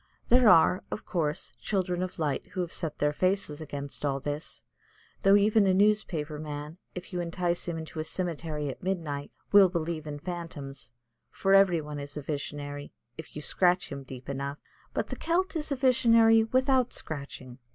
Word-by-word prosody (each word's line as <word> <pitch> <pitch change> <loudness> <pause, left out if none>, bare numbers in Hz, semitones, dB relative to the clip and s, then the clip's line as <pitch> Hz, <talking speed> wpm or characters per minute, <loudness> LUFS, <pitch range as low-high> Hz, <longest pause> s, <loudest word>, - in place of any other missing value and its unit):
There 245 -2 +6
are, 180 0 +6
of - - -5
course, 155 -5 -2
children 185 -3 -1
of 185 0 -4
light 150 -3 -1
who 185 - -1
have 175 -1 -4
set 160 -4 -3
their 150 0 +1
faces 185 -3 0
against 145 -2 -6
all 140 -2 0
this, 145 +3 -5 0.6
though 195 +1 +6
even 205 0 +4
a 185 - +4
newspaper 185 -7 +1
man, 150 +2 -6 0.2
if 180 +2 -8
you 175 - -1
entice 175 0 -1
him 170 -1 -2
into 160 0 -7
a - - 0
cemetery 160 -3 -3
at 135 - -6
midnight, 160 -7 -3 0.2
will 200 -2 +8
believe 165 -2 -3
in 145 -1 -4
phantoms, 145 -5 -7 0.4
for 195 0 +1
every 190 -4 +5
one 150 -1 -6
is 140 +1 -7
a 150 - -5
visionary, 145 0 -5 0.2
if 160 - -10
you 150 - -6
scratch 180 +2 +2
him 140 0 -5
deep 130 -1 -10
enough. 140 +1 -3 0.3
But - - -2
the - - -3
Celt 365 +2 0
is 305 -2 -3
a - - +2
visionary 230 -3 +5
without 255 +1 +2
scratching. 140 -4 -6
165 Hz, 180 wpm, -29 LUFS, 145-195 Hz, 0.6 s, will